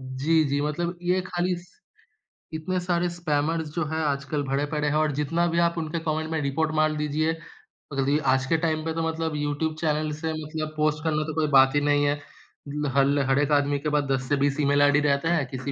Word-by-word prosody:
जी, 135 +5 +1
जी 140 0 0
मतलब 170 +4 -2
ये 180 +1 +1
खाली 180 0 -1
स 175 +1 -14 0.8
इतने 175 +4 -2
सारे 175 0 0
स्पैमर्स 160 -1 -1
जो 170 -2 0
हैं 160 +1 -3
आजकल 145 0 -1
भरे 135 +1 -1
पड़े 150 0 -1
हैं 145 - 0
और 155 -1 +2
जितना 165 +4 +1
भी - - +2
आप 170 - +1
उनके 160 +1 -2
कॉमेंट 155 +1 -1
में 160 -1 -1
रिपोर्ट 150 +3 0
मार 155 0 +3
दीजिए 150 +2 0 0.6
जल्दी 140 +2 +2 0.2
आज 130 0 +1
के 165 - +2
टाइम 155 -1 0
पे 160 - -1
तो 165 0 -1
मतलब 160 -1 -2
यूट्यूब 150 +2 -1
चैनल 155 -1 0
से 160 0 -2
मतलब 155 0 -5
पोस्ट 155 +1 +1
करना 155 -1 0
तो - - -6
कोई 155 -1 +1
बात 135 +2 +6
ही 145 - +3
नहीं 145 0 +3
है। 145 0 0 0.5
ल 150 +1 -2
हल 140 +1 +3
हर 135 +1 +3
एक 145 0 +1
आदमी 145 0 -1
के 150 +2 -2
पास 145 - +1
10 130 -1 -1
से 145 - +3
20 145 +1 +1
ईमेल 145 0 +3
आईडी 145 0 +5
रहता 140 +5 +1
हैं, 150 -6 +1
किसी 130 +1 -5
155 Hz, 225 wpm, -25 LUFS, 145-160 Hz, 0.8 s, बात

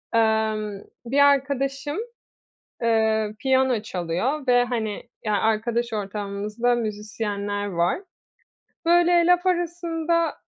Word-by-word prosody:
Emm, 220 -2 +1 0.2
bir 265 +4 0
arkadaşım, 280 +1 +2 0.9
eee, 220 -2 +2
piyano 260 -3 +2
çalıyor 210 - -2
ve 245 0 +5
hani, 225 -3 -3 0.2
ya, 215 -1 0
arkadaş 230 +2 0
ortamımızda 210 +3 -2
müzisyenler 205 -2 -3
var. 175 - 0 0.9
Böyle 345 0 +5
laf 355 +1 +3
arasında, 340 -1 0
230 Hz, 90 wpm, -24 LUFS, 210-280 Hz, 0.9 s, ve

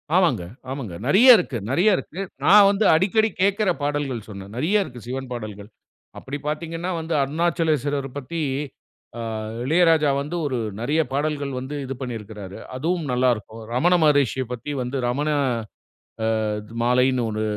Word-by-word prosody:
ஆமாங்க. 180 - +3 0.3
ஆமாங்க. 120 -11 -5
நெறைய 240 - +8
இருக்கு, 140 - -2
நெறைய 185 +9 +4
இருக்கு. 185 +5 -6 0.2
நான் 200 +1 +8
வந்து 200 +2 +1
அடிக்கடி 215 +6 +3
கேட்கிற 200 0 +2
பாடல்கள் 140 -6 -2
சொன்னேன். 100 -1 -9
நெறைய 195 +10 +2
இருக்கு 125 -7 -10
சிவன் 130 +1 -4
பாடல்கள். 105 -3 -7 0.5
அப்டி 140 +2 -6
பார்த்தீங்கன்னா 165 +4 -3
வந்து, 160 +1 -3
அருணாச்சலேஸ்வரர் 150 -2 0
பத்தி 160 +4 -4 0.8
ஆ - - -3 0.4
இளையராஜா 160 0 +4
வந்து 150 +5 -4
ஒரு 130 -3 -1 0.2
நெறைய 145 +7 +1
பாடல்கள் 145 0 -1
வந்து 130 +3 -5
இது 135 - -4
பண்ணியிருக்கிறாரு. 105 -5 -7 0.2
அதுவும் 165 +4 -1
நல்லா 125 +1 +2
இருக்கும். 110 +2 -10
ரமண 170 +9 +3
மகரிஷிய 140 -4 +3
பத்தி 125 +4 -5
வந்து, 125 +2 -3
ரமண 145 +5 0 1.2
அ - - -1 0.3
மாலைன்னு 125 +1 +3
ஒரு 110 0 -2
145 Hz, 140 wpm, -23 LUFS, 125-170 Hz, 1.2 s, நெறைய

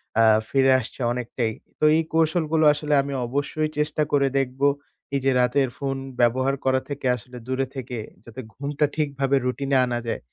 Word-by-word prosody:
অ্যা 115 +1 +5 0.2
ফিরে 135 -1 +4
আসছে 130 - -8
অনেকটাই। 120 -1 -2 0.3
তো - - -5
এই 165 - +2
কৌশলগুলো 160 -1 +2
আসলে 150 0 -2
আমি 140 0 -5
অবশ্যই 145 +4 -1
চেষ্টা 150 0 0
করে 140 -1 +3
দেখব। 135 0 -3 0.5
এই 140 - +2
যে 135 - +4
রাতের 130 +1 +2
ফোন 135 -1 -2 0.2
ব্যবহার 130 +3 +2
করা 130 0 +2
থেকে 140 -2 -5
আসলে 125 +1 -11
দূরে 130 +1 0
থেকে 125 -2 -5 0.3
যাতে 120 +2 -10
ঘুমটা 145 +1 -1
ঠিকভাবে 140 -3 0
routine-এ 135 +1 0
আনা 120 -1 -2
যায়, - - -2
135 Hz, 170 wpm, -24 LUFS, 125-145 Hz, 0.5 s, অ্যা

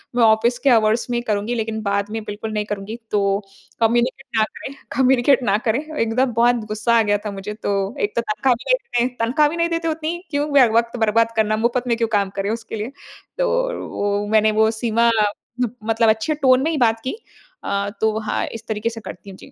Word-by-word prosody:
मैं 245 - +3
ऑफिस 225 +2 +4
के 280 - +2
आवर्स 225 0 +3
में 240 - 0
ही 240 - -1
करूँगी 210 +2 -1
लेकिन 220 -1 -3
बाद 200 0 -1
में 225 0 -3
बिल्कुल 210 +1 -6
नहीं 210 -1 -1
करूँगी। 205 +1 -5 0.2
तो 205 -1 +2 0.6
कम्युनिकेट 240 +4 +1
ना 220 - +5
करें 265 +5 -9 0.2
कम्युनिकेट 260 0 +4
ना 205 -3 +2
करें। 230 +2 +2 0.2
एकदम 235 +3 +1
बहुत 240 +2 +4
गुस्सा 215 +2 0
आ - - +5
गया 205 -1 +2
था 210 - -2
मुझे 200 +1 -6
तो। 210 -1 -3 0.3
एक 205 - -1
तो 235 - +2
तनख़्वाह 230 +3 +1
अभी 255 - -1
तक 470 - -1
नहीं 245 +2 +2
तनख़्वाह 260 +6 +3
भी 335 - -5
नहीं 335 0 +1
देते 330 0 -1
उतनी, 320 +1 -2
क्यों 290 0 -1 0.3
वक़्त 235 +1 +1
बर्बाद 225 +1 +2
करना, 215 -1 +1
मुफ़्त 240 +2 0
में 235 -1 +1
क्यों 230 - +1
काम 200 -1 0
करें 195 +1 -2
उसके 225 0 -4
लिए। 220 +4 -4 0.5
तो - - +1 0.5
वो 205 0 0
मैंने 215 0 +4
वो 220 - +5
सीमा 235 0 +2 0.7
मतलब 225 0 +2
अच्छे 220 +8 +1
टोन 260 -3 +4
में 320 - +1
ही 315 - -1
बात 230 -3 +2
की। 260 - -3 0.5
अ, 200 0 -1
तो 220 0 +2
हाँ, 215 - -2
इस 225 0 -9
तरीके 220 +1 -1
से 225 -1 -8
करती 205 - -10
हूँ। 190 - -11
जी। - - -14
225 Hz, 220 wpm, -21 LUFS, 215-245 Hz, 0.7 s, ना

